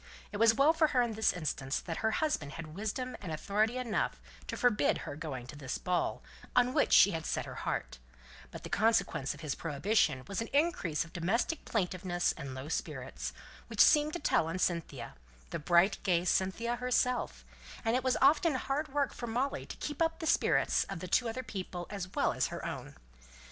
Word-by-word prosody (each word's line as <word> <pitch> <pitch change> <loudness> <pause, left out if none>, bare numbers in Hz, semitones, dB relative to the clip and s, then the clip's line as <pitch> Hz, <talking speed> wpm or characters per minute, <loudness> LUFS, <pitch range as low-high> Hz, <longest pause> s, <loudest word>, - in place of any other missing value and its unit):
It 205 - -4
was 225 +1 +5
well 285 +6 +5
for 320 -1 +4
her 255 -4 +2
in 235 -2 -2
this 220 +1 +3
instance 145 -5 -2
that 165 -2 -5
her 220 - +1
husband 220 - -1
had 160 -2 -8
wisdom 220 +7 -3
and 180 -5 -5
authority 210 +9 0
enough 245 -4 -1 0.3
to - - -4
forbid 245 -4 +2
her - - -5
going 145 -5 -5
to 130 - -10
this 135 -3 -4
ball, 180 -1 -1 0.3
on 250 0 +4
which 295 - +2
she 200 - +8
had 165 -3 -3
set - - -2
her - - -7 0.2
heart; - - -3 0.5
but - - -10
the - - -7
consequence 195 -10 +1
of 145 - -13
his 150 -3 -2
prohibition 155 - +1
was 195 +2 -2
an 230 - -3
increase 280 - +1
of 170 - -16
domestic 205 - -1
plaintiveness 180 -3 0
and 135 -1 -7
low 130 +2 -6
spirits, 165 - -4 0.4
which - - -8
seemed 300 0 +6
to 350 - -3
tell 160 - +2
on 165 +3 -3
Cynthia 170 - -2 0.4
the - - -3
bright 175 +5 +3
gay 180 -3 +1
Cynthia 190 +7 0
herself 250 - 0 0.4
and 225 +1 +2
it 255 - 0
was 260 -1 +2
often 300 +2 +5
hard 275 +4 -1
work 285 -1 -1
for 240 - -6
Molly 250 +5 -2
to - - -8
keep 295 +1 -5
up 325 0 +2
the 330 - -5
spirits - - +3
of 185 -2 -6
two 240 -2 +3
other 255 +3 -4
people 185 -5 -5
as 195 -3 -4
well - - +2
as - - 0
her - - -6
own. - - -6
205 Hz, 200 wpm, -32 LUFS, 165-250 Hz, 0.5 s, she